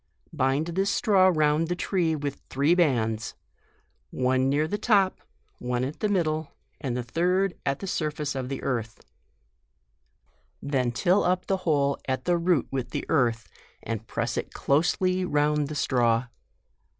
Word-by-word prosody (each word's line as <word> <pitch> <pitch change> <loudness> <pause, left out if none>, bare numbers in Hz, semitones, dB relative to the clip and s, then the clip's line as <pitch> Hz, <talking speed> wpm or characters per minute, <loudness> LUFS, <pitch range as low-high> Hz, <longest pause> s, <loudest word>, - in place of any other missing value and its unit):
Bind 135 0 +1
this 190 +3 0
straw 195 -2 +4
round 155 0 +2
the 175 - -1
tree 175 -3 0
with 145 -2 -4
three 140 +5 +2
bands, 115 -10 +1 0.7
one 130 +1 +1
near 150 +3 +1
the 205 +5 -3
top, 200 -5 +2 0.4
one 125 0 -2
at 140 +4 -4
the 210 - 0
middle, 155 -6 -1 0.3
and 125 -3 -3
the 125 - -2
third 180 +9 +1
at 140 0 -1
the - - -4
surface 150 -5 -2
of 130 -2 -4
the 135 - -5
earth; 115 -5 -3 1.6
then 130 -4 0
till 180 - +2
up 180 +1 +1
the 195 - 0
hole 140 -2 +2
at 130 -1 -2
the 175 -1 +2
root 170 -5 +2
with 130 -2 -3 0.2
earth, 120 -7 +1 0.4
and 110 0 -5
press - - -2
it - - -4
closely 185 +5 +1
round 150 -3 +1
the 155 - -6
straw. 120 -4 +2
150 Hz, 150 wpm, -26 LUFS, 130-175 Hz, 1.6 s, straw